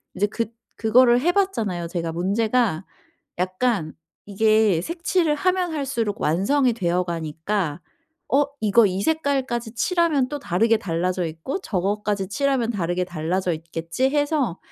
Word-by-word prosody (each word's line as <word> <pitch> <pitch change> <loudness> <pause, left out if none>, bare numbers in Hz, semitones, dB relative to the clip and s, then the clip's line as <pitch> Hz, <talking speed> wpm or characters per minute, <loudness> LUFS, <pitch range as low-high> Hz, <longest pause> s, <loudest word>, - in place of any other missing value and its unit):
이제 205 +3 +1
그 230 +2 -2 0.3
그거를 240 +2 +4
해 350 +5 +3
봤잖아요. 220 - -1
제가 170 -1 -3
문제가 200 +2 0 0.5
약간 185 -2 0 0.3
이게 215 -2 +3
색칠을 335 - 0
하면 365 +2 0
할수록 265 -8 -2
완성이 240 - +2
되어 180 -5 0
가니까 165 +1 -3 0.5
어 285 +2 +5 0.2
이거 215 +1 +5
이 190 0 -2
색깔까지 270 -6 -1
칠하면 315 -2 +1
또 290 - -4
다르게 225 -1 +2
달라져 180 0 -1
있고 160 - -4
저것까지 200 - -1
칠하면 265 0 0
다르게 180 -3 -1
달라져 175 +2 -2
있겠지 165 +8 -2
해서 290 - 0
210 Hz, 300 characters per minute, -23 LUFS, 180-270 Hz, 0.5 s, 어